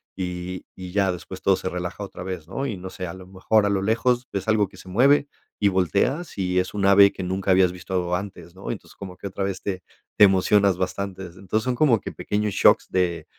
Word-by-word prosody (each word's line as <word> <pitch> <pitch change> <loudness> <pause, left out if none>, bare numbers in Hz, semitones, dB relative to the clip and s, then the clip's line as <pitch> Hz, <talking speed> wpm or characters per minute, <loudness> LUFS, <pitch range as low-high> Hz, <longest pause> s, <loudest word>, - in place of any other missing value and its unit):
y 90 0 -5
y 90 -1 -8
ya 100 -1 +2
después 95 +1 -9
todo 95 - +4
se 95 - -4
relaja 90 +2 -5
otra 100 - -9
vez, 90 -4 -6
¿no? 135 +8 -3
Y 115 -7 -3
no 95 0 -8
sé, 90 0 -6
a 85 - -6
lo 95 -1 -11
mejor 95 +3 +1
a - - +2
lo 100 -1 0
lejos 120 +4 +1
ves 95 0 -3
algo 105 -2 +3
que 95 - -18
se 95 - -12
mueve 140 +9 +4 0.3
y 100 - +3
volteas, 100 - 0
y 90 -1 +1
es 90 - -2
un 100 -1 -1
ave 100 0 +7
que 95 - -6
nunca 95 +1 -1
habías 95 -1 +4
visto 90 0 -3
antes, 90 -3 -7
¿no? 95 - -8
Y - - 0
entonces - - -12
como 95 -2 -8
que 100 - -7
otra 95 0 -3
vez 100 -1 -4
te 95 -2 -4 0.3
te 105 - +9
emocionas 100 0 +3
bastante. 95 +1 -3
Entonces, 95 +4 -3
son 125 0 -1
como 120 -6 +3
que - - -6
pequeños 105 0 -2
shocks - - +4
de 85 -3 0
95 Hz, 240 wpm, -24 LUFS, 90-100 Hz, 0.3 s, te